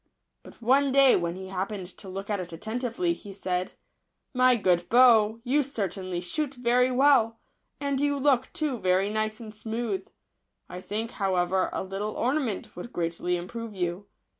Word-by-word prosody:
But - - -15
one 270 +4 +4
day, 275 -1 +6
when 170 -1 -1
he 190 0 -8
happened 190 +1 -3
to 195 - -9
look 195 +3 -5
at 205 - 0
it 175 -2 -6
atten 220 +8 -4
tively, 260 +8 0
he 205 -11 -10
said, 185 -2 -3 0.3
" - - -52
My 255 -1 +7
good 180 -5 +1
bow, 230 -3 +6
you 270 +4 +2
certainly 195 -9 -3
shoot 280 - -3
very 245 +1 +3
well, 255 -4 +4 0.4
and 280 -1 -1
you 290 0 +1
look, 265 -2 +2
too, 290 -6 -2
very 190 +2 +2
nice 215 0 -2
and 220 -2 -9
smooth; 220 -3 -3 0.6
I 180 - -8
think, 220 +4 -3
however, 185 -1 +1
a - - -3
little 195 +3 -4
ornament 250 -5 -1
would 180 +7 -8
greatly 170 +1 -1
improve 220 +5 -7
you. 180 +2 -3
215 Hz, 170 wpm, -27 LUFS, 185-255 Hz, 0.6 s, My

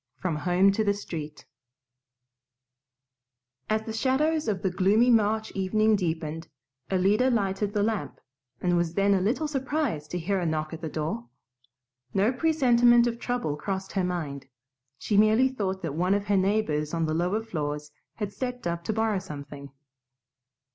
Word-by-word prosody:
From 170 +1 -2
Home 180 +5 +3
to 220 +2 0
the 200 -1 +1
Street 155 -7 -7 2.2
As 215 0 +1
the 220 - -6
shadows 295 +6 +1
of 200 -4 -1
the 190 - +1
gloomy 205 +7 +3
March 220 -1 +2
evening 215 +3 +2
deepened, 160 -3 -3 0.4
Alida 200 +7 +3
lighted 205 -3 0
the 205 -2 +1
lamp, 210 - -2 0.4
and 175 -1 +2
was 170 -1 0
then 200 0 +3
a 190 - +2
little 255 +11 0
surprised 270 - -2
to 180 - -3
hear 190 +3 -1
a 175 - -2
knock 155 0 -2
at 165 - -7
the 160 - -4
door. 150 -7 -4 0.9
No 205 +6 +3
presentiment 245 -5 +4
of 235 -1 -2
trouble 245 -13 -2
crossed 190 +5 -4
her 190 - 0
mind; 150 -7 -3 0.5
she 205 - -1
merely 215 +5 +5
thought 190 -7 -3
that 160 -4 -3
one 180 +5 +1
of 205 0 -2
her 205 0 +1
neighbors 185 -6 0
on 165 -1 0
the 155 - -1
lower 180 +7 0
floors 150 -7 -4 0.2
had 205 -2 -4
stepped 250 -1 -5
up 170 0 -2
to 220 - -1
borrow 220 -2 +1
something. 145 -5 -9
195 Hz, 160 wpm, -27 LUFS, 165-220 Hz, 2.2 s, merely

